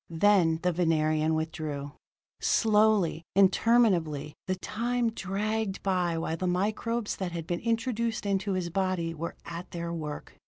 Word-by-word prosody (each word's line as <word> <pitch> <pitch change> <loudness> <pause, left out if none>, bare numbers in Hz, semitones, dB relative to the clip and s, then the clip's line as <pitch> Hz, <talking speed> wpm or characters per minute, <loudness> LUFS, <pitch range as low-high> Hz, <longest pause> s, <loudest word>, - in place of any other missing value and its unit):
Then 170 -1 +4
the 180 - +3
Venerian 155 -2 +2
withdrew. 155 -3 -3 0.5
Slowly, 210 -7 +3
interminably, 190 -7 +3
the 185 - 0
time 235 +4 -1
dragged 210 0 -2
by 180 -3 +1
while 165 0 -2
the 185 +2 -2
microbes 210 +5 -1
that 180 -3 -3
had 165 -2 -4
been 175 +1 -2
introduced 230 -1 -1
into 200 0 0
his 180 -2 -2
body 185 -3 0
were 165 +1 -5
at 170 +1 -7
their 170 -1 -4
work. 150 -3 -6
185 Hz, 135 wpm, -28 LUFS, 165-210 Hz, 0.5 s, Then